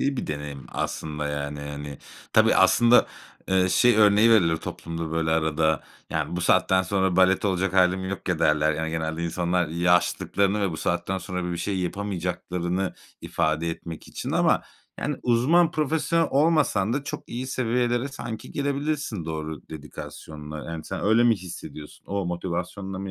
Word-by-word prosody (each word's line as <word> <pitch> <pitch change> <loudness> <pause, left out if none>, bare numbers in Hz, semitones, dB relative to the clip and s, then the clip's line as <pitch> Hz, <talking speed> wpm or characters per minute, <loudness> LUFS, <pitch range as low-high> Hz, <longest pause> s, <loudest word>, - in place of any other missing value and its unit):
iyi 140 0 0
bir - - -3
deneyim 75 -2 -6
aslında, 75 -1 -3
yani, 75 0 -4
hani. 70 -1 -7 0.3
Tabii, - - +5
aslında, 120 +1 +5 0.4
eee, 95 -1 +3
şey 105 +6 +4
örneği 105 +1 +6
verilir 85 -8 +4
toplumda, 85 0 -6
böyle, 80 -1 0
arada, 80 -1 +1 0.3
yani, 85 - -2
"Bu - - -2
saatten 95 +1 +3
sonra 95 0 0
balet 95 +1 +4
olacak 95 -1 0
hâlim 95 0 +3
yok 100 0 -5
ya." 90 -3 +1
derler. 75 -1 +3
Yani, 80 +1 -3
genelde 80 +1 -2
insanlar 85 0 0
yaşlılıklarını 90 +4 +1
ve 100 - +1
bu 80 - -5
saatten 90 +4 -1
sonra 90 0 -4
böyle 90 0 -3
bir 85 - -4
şey 95 +2 -2
yapamayacaklarını 90 -1 -2 0.3
ifade 80 0 0
etmek 80 -1 -8
için. - - -5
Ama, - - +3 0.4
yani, 150 -1 -2
uzman, 145 +8 +4
profesyonel 160 +1 +1
olmasan 145 - +2
da 140 +2 -2
çok - - -5
iyi 125 +2 -4
seviyelere 120 0 0
sanki 120 -5 -7
gelebilirsin 140 - -2
doğru 80 -1 -5
dedikasyonla. 75 0 -8
Yani, 80 -1 -6
sen - - -5
öyle 110 +3 +4
mi 115 -3 +4
hissediyorsun? 85 -4 -10
O 100 -2 -2
motivasyonla 90 +2 -4
mı 95 0 -5
90 Hz, 160 wpm, -25 LUFS, 80-110 Hz, 0.4 s, örneği